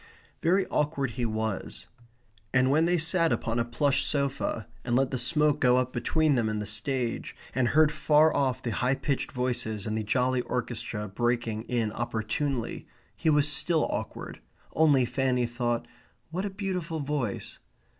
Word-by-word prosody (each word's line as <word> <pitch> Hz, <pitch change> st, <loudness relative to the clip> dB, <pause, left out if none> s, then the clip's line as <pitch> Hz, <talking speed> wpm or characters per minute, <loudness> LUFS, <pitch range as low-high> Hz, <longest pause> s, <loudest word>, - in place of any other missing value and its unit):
Very 185 Hz, +3 st, +3 dB
awkward 145 Hz, -4 st, 0 dB
he 120 Hz, +1 st, -2 dB
was. 110 Hz, -2 st, -3 dB, 0.7 s
And 130 Hz, +1 st, +4 dB
when 155 Hz, +3 st, +4 dB
they 175 Hz, +1 st, +2 dB
sat 165 Hz, +1 st, +2 dB
upon 115 Hz, +1 st, -1 dB
a -, -, +3 dB
plush 135 Hz, +4 st, +1 dB
sofa 140 Hz, -6 st, -1 dB, 0.2 s
and 120 Hz, -1 st, 0 dB
let 135 Hz, +1 st, +2 dB
the 130 Hz, -, -1 dB
smoke 150 Hz, +4 st, +2 dB
go 125 Hz, -1 st, +4 dB
up 130 Hz, 0 st, 0 dB
between 155 Hz, +5 st, +2 dB
them 115 Hz, -4 st, +1 dB
and 105 Hz, 0 st, -2 dB
the 105 Hz, -, -3 dB
stage, 115 Hz, +3 st, -2 dB, 0.2 s
and 130 Hz, -1 st, +2 dB
heard 155 Hz, +3 st, +4 dB
far 155 Hz, +1 st, +4 dB
off 130 Hz, -4 st, 0 dB
the 120 Hz, -, -2 dB
high 125 Hz, +4 st, +1 dB
pitched 140 Hz, 0 st, -2 dB
voices 120 Hz, -5 st, -2 dB
and 110 Hz, -, -2 dB
the 110 Hz, -, -1 dB
jolly 125 Hz, +3 st, +1 dB
orchestra 115 Hz, -4 st, -3 dB
breaking 115 Hz, +1 st, -1 dB
in 115 Hz, -3 st, -1 dB
opportunely 120 Hz, +3 st, -3 dB, 0.3 s
he 160 Hz, -, 0 dB
was 150 Hz, -1 st, +4 dB
still 155 Hz, +3 st, +2 dB
awkward, -, -, -5 dB, 0.3 s
only 145 Hz, -5 st, +4 dB
Fanny 125 Hz, -1 st, +1 dB
thought: 120 Hz, 0 st, -2 dB, 0.4 s
"What 185 Hz, +4 st, -2 dB
a -, -, -1 dB
beautiful 185 Hz, -5 st, -3 dB
voice!" 140 Hz, -7 st, -3 dB
130 Hz, 165 wpm, -28 LUFS, 120-150 Hz, 0.7 s, And